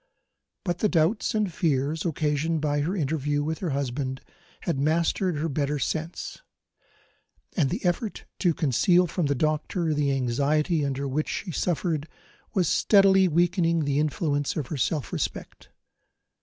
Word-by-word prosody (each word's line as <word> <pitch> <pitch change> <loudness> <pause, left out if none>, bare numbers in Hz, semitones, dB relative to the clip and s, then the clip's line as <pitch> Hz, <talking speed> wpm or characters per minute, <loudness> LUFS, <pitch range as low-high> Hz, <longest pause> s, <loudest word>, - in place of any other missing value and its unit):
But 175 -2 -1
the 215 - +2
doubts 180 +7 +1
and 210 -5 0
fears 155 -3 0
occasioned 155 0 0
by 145 -1 0
her 170 +7 -1
interview 145 -3 0
with 160 +1 -3
her 180 - -2
husband 135 -1 -2 0.4
had 165 -6 -1
mastered 165 +4 +1
her 155 +3 -1
better 145 0 -1
sense; 160 - -4 1.1
and 150 -8 +2
the 190 +4 -3
effort 185 +5 -1
to 175 -5 +2
conceal 175 +6 +3
from 170 -2 -1
the 140 - +1
doctor 155 +3 0
the 145 -1 +1
anxiety 145 +5 +1
under 140 0 -2
which 150 +3 -1
she 185 - -3
suffered 165 -2 -1 0.5
was 180 -4 +2
steadily 195 0 +5
weakening 170 -1 +2
the 140 0 +1
influence 145 -1 0
of 150 - -2
her 155 - -3
self 145 +3 -1
respect. - - -4
155 Hz, 145 wpm, -26 LUFS, 145-175 Hz, 1.1 s, steadily